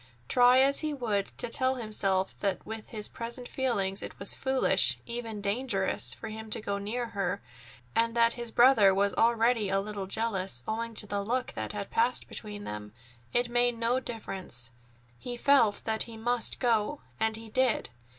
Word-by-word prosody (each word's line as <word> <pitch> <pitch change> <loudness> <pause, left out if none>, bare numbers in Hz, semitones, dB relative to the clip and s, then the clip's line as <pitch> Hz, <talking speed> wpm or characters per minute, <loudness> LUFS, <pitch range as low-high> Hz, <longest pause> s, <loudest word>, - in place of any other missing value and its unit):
Try 245 - +5
as 275 +1 +4
he 305 -2 -1
would 215 -7 -1
to - - +1
tell 260 +3 +3
himself 195 -5 -1
that 200 -2 -2
with 220 0 -7
his 210 -2 0
present 240 +2 -5
feelings 200 -7 -1
it - - -7
was 200 - 0
foolish, 265 0 +3
even 230 -3 -5
dangerous, 200 - 0
for 120 - -7
him 220 0 -8
to - - +1
go 200 -2 -3
near 230 +4 -3
her, 200 -1 -2 0.6
and 230 0 +2
that 230 0 +4
his 235 -1 -3
brother 225 -5 +6
was 200 0 +2
already 230 -2 +2
a 195 0 +2
little 200 -1 -5
jealous 195 - -2
owing 230 +1 -3
to 210 - +3
the 200 0 -2
look 250 +5 -1
that - - -4
had 200 -1 -5
passed 240 +2 +1
between 205 -1 -7
them, 105 - -7 0.4
it 240 0 +1
made 240 0 +2
no 235 +2 +1
difference; 190 - -5 0.5
he 245 - -6
felt 240 -6 +4
that 220 -1 -1
he 225 - -9
must 240 +1 +1
go, 240 +3 +1 0.2
and 220 0 +1
go 225 - -5
he 225 - -11
did. 255 - +1
225 Hz, 180 wpm, -29 LUFS, 200-240 Hz, 0.6 s, brother